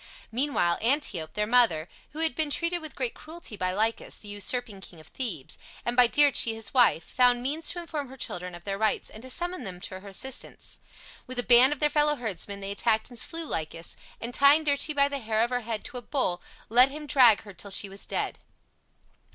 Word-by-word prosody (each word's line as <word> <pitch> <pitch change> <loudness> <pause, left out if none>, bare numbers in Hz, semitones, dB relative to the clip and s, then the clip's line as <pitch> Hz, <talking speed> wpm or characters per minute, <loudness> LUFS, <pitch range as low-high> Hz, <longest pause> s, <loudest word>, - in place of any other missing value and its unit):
Meanwhile 235 -9 +1
Antiope, 215 - 0
their 210 - +1
mother, 215 -9 +3 0.2
who 310 - -6
had 325 -1 +1
been 315 -2 -1
treated 335 +3 -1
with 315 -2 -9
great 250 -3 -2
cruelty 320 -7 -9
by 185 -2 -1
Lycus, 220 +4 -1
the 210 - -11
usurping 205 +1 -2
king 175 -3 -13
of 155 - -14
Thebes, 190 - -3 0.3
and 240 - -1
by 250 -1 +7
Dirce, 290 +2 +5
his 225 -1 -4
wife, 245 -10 +4
found 245 -1 +3
means 300 +4 -2
to - - -3
inform 310 -5 -5
her 265 +1 -12
children 180 -6 -4
of 175 - -12
their 195 +1 -4
rights 220 -1 0
and 215 - -11
to 260 - -10
summon 350 +2 -3
them 185 -4 -7
to 185 0 -7
her 200 - -14
assistance. 255 +7 -5 0.5
With 255 0 -8
a 245 - +1
band 250 +3 +7
of 295 - -1
their 300 - +4
fellow 295 0 +2
herdsmen 200 - -5
they 195 0 -4
attacked 220 +3 +1
and 240 - -7
slew 330 0 -3
Lycus, 165 - -4 0.2
and 235 +2 -5
tying 280 +4 +5
Dirce 285 0 +1
by 280 0 +4
the 280 0 -4
hair 220 -2 0
of 240 - -2
her 250 0 -1
head 225 -1 -4
to 255 - -7
a - - -13
bull, 245 -10 -1 0.3
let 250 +4 +6
him 300 +2 -7
drag 250 -7 +5
her 205 -2 -11
till 195 +3 -9
she 200 +1 0
was 195 +1 -8
dead. - - -2
245 Hz, 220 wpm, -27 LUFS, 200-280 Hz, 0.5 s, by